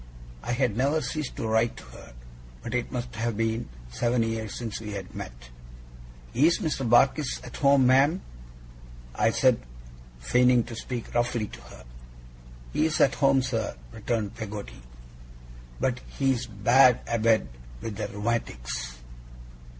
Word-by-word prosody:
I 120 Hz, -, -2 dB
had 120 Hz, -4 st, +1 dB
never 140 Hz, +6 st, +2 dB
ceased 150 Hz, +1 st, -4 dB
to 115 Hz, -, -3 dB
write 110 Hz, +1 st, +1 dB
to -, -, -10 dB
her, -, -, -13 dB, 0.5 s
but 115 Hz, -, -5 dB
it 120 Hz, 0 st, -1 dB
must 125 Hz, -1 st, -4 dB
have 115 Hz, -1 st, -1 dB
been 115 Hz, -, -1 dB, 0.2 s
seven 120 Hz, -, +1 dB
years 110 Hz, -2 st, -3 dB
since 115 Hz, -3 st, -4 dB
we 105 Hz, -2 st, -6 dB
had 95 Hz, -2 st, -7 dB
met. -, -, -9 dB, 0.8 s
'Is 155 Hz, +7 st, +4 dB
Mr. 150 Hz, -, -2 dB
Barkis 135 Hz, +4 st, +3 dB
at 125 Hz, -, -9 dB
home, 140 Hz, -2 st, +5 dB
ma'am?' 140 Hz, +8 st, +4 dB, 0.9 s
I -, -, +2 dB
said, -, -, +3 dB, 0.6 s
feigning 125 Hz, -, +4 dB
to 115 Hz, 0 st, -8 dB
speak 120 Hz, +1 st, -6 dB
roughly 120 Hz, -2 st, +1 dB
to -, -, -11 dB
her. -, -, -13 dB, 0.9 s
'He's 155 Hz, 0 st, +1 dB
at 135 Hz, -, +5 dB
home, 135 Hz, -2 st, +3 dB
sir,' 115 Hz, -4 st, -2 dB, 0.2 s
returned 110 Hz, -, -2 dB
Peggotty, 105 Hz, -, -7 dB, 1.0 s
'but 125 Hz, -1 st, 0 dB
he's 130 Hz, -3 st, 0 dB
bad 120 Hz, +4 st, +5 dB
abed 115 Hz, -6 st, +2 dB, 0.3 s
with 105 Hz, -3 st, -5 dB
the 110 Hz, -, -2 dB
rheumatics. 100 Hz, -, -3 dB
120 Hz, 140 wpm, -27 LUFS, 110-130 Hz, 1.0 s, home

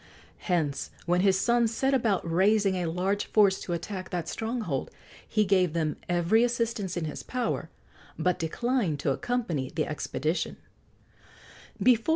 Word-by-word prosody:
Hence, 160 Hz, -7 st, 0 dB, 0.2 s
when 175 Hz, +1 st, +2 dB
his 190 Hz, -1 st, +4 dB
sons 235 Hz, +1 st, +3 dB
set 265 Hz, +4 st, +1 dB
about 220 Hz, -9 st, +1 dB
raising 195 Hz, +4 st, +3 dB
a 180 Hz, -2 st, -1 dB
large 185 Hz, +5 st, 0 dB
force 200 Hz, -3 st, +4 dB
to 175 Hz, -, -4 dB
attack 185 Hz, +3 st, -5 dB
that 175 Hz, -2 st, -3 dB
stronghold, 220 Hz, -, -2 dB, 0.4 s
he 215 Hz, -1 st, +2 dB
gave 185 Hz, -4 st, +3 dB
them 155 Hz, -3 st, 0 dB
every 175 Hz, +6 st, +3 dB
assistance 230 Hz, -6 st, -1 dB
in 170 Hz, -, -1 dB
his 150 Hz, -, -5 dB
power, 250 Hz, -3 st, -2 dB, 0.5 s
but 180 Hz, -1 st, +1 dB
declined 190 Hz, -, 0 dB
to 140 Hz, -, +1 dB
accompany 170 Hz, -, -1 dB
the 155 Hz, -1 st, -1 dB
expedition. 155 Hz, +2 st, -2 dB
185 Hz, 140 wpm, -28 LUFS, 165-225 Hz, 0.5 s, his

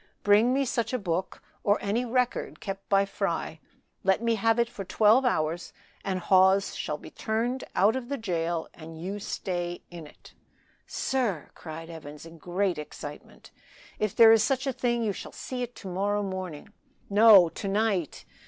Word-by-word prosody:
Bring 210 Hz, +4 st, +5 dB
me 275 Hz, +1 st, +1 dB
such 235 Hz, 0 st, -1 dB
a -, -, +2 dB
book 185 Hz, -4 st, -3 dB, 0.2 s
or 205 Hz, +1 st, +3 dB
any 220 Hz, +5 st, -1 dB
record 250 Hz, 0 st, -1 dB
kept 195 Hz, -1 st, -6 dB
by 195 Hz, 0 st, +4 dB
Fry; 170 Hz, -5 st, -3 dB, 0.4 s
let 190 Hz, 0 st, +3 dB
me 230 Hz, 0 st, +1 dB
have 225 Hz, +1 st, +2 dB
it 235 Hz, 0 st, +2 dB
for 210 Hz, -4 st, -7 dB
twelve 215 Hz, +7 st, +4 dB
hours 165 Hz, -6 st, -1 dB, 0.3 s
and 190 Hz, -2 st, -2 dB
Hawes 190 Hz, +2 st, +4 dB
shall 150 Hz, -, -3 dB
be -, -, -12 dB
turned 235 Hz, +4 st, -2 dB
out 205 Hz, +5 st, +4 dB
of 260 Hz, -1 st, -5 dB
the 280 Hz, -, -2 dB
jail 170 Hz, -6 st, -2 dB
and 160 Hz, 0 st, -11 dB
you 195 Hz, +5 st, -4 dB
stay 175 Hz, -3 st, -4 dB
in 170 Hz, -3 st, -9 dB
it." -, -, -18 dB, 0.5 s
"Sir!" 235 Hz, -, -2 dB
cried 165 Hz, +1 st, -9 dB
Evans, 150 Hz, -2 st, -10 dB
in 165 Hz, 0 st, -13 dB
great 180 Hz, +1 st, -1 dB
excitement, 150 Hz, -1 st, -10 dB, 0.5 s
"if 215 Hz, -3 st, -1 dB
there 225 Hz, -1 st, +8 dB
is 225 Hz, -1 st, +6 dB
such 265 Hz, +2 st, 0 dB
a 270 Hz, -, -1 dB
thing 240 Hz, -2 st, 0 dB
you 210 Hz, -2 st, 0 dB
shall -, -, -8 dB
see 255 Hz, -1 st, -5 dB
it 245 Hz, 0 st, -5 dB
to -, -, -10 dB
morrow 200 Hz, +3 st, -1 dB
morning." 185 Hz, -1 st, -6 dB, 0.3 s
"No! 205 Hz, -3 st, +7 dB
to 195 Hz, -, -6 dB
night! 200 Hz, -5 st, -1 dB
200 Hz, 175 wpm, -27 LUFS, 175-230 Hz, 0.5 s, there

